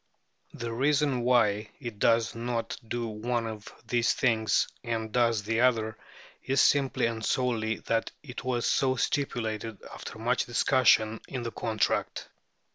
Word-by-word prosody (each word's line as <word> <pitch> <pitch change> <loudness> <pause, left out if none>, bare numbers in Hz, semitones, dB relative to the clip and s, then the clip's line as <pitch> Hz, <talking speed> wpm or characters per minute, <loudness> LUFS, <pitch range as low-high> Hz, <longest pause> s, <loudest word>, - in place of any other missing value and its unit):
The 115 -1 -4
reason 140 0 +2
why 110 -4 +2
it 120 -6 -7
does 115 0 +3
not 115 0 -3
do 120 +1 -2
one 115 +2 -2
of 110 -2 -7 0.2
these 120 0 +2
things 110 -4 +2 0.2
and 115 -2 -3
does 115 -2 +2
the 115 +2 0
other 110 -3 +2 0.5
is 135 +1 +1
simply 140 -4 +3
and 115 -1 -2
solely 115 -3 0
that 115 0 0
it 125 -3 -8
was 125 -2 -1
so 130 -1 +2
stipulated, 115 -5 -2 0.2
after - - -8
much 120 +3 0
discussion, 115 -3 +3
in 125 -2 -4
the 115 - -4
contract. 110 -1 -1
115 Hz, 140 wpm, -28 LUFS, 110-125 Hz, 0.5 s, does